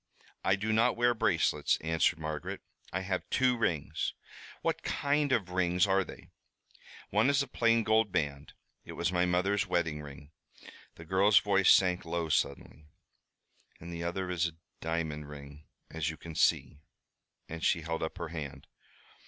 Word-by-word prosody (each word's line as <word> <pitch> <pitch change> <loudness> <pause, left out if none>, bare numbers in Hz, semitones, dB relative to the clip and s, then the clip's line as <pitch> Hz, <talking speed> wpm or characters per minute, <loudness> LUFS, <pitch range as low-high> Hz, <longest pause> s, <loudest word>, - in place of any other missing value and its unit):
"I 95 - +3
do 110 +2 -1
not 115 +3 +3
wear 120 0 +3
bracelets," 115 - +1
answered 80 +2 +1
Margaret. 80 -2 -5 0.3
"I 95 - -2
have 95 -1 -3
two 130 -1 +3
rings." 85 -10 -1 0.5
"What - - 0
kind 145 0 0
of 105 -8 0
rings 90 0 +2
are 95 -1 +2
they?" - - -12 0.8
"One 110 +6 +3
is 140 0 +3
a - - -8
plain 115 -2 +2
gold 110 -1 +2
band. 70 -3 -2 0.3
It - - -9
was 85 +1 -1
my 90 0 +2
mother's 100 +3 +1
wedding 85 -4 -1
ring." 70 0 -11 0.6
The 80 - -11
girl's 95 +4 +4
voice 100 -2 +4
sank 90 -1 +4
low 85 -1 -3
suddenly. 75 +1 -2 0.9
"The 85 0 -6
other 90 +2 -2
is 85 -1 +1
a 85 - -8 0.3
diamond 80 -2 -3
ring, 75 0 -11 0.2
as 80 -1 -2
you 80 - -6
can 85 - -9
see," 75 - +1 0.7
and 80 0 -7
she 85 - +2
held 80 +1 -3
up 80 +3 -4
her 85 -3 -5
hand. 70 -4 -7
90 Hz, 160 wpm, -31 LUFS, 80-100 Hz, 0.9 s, girl's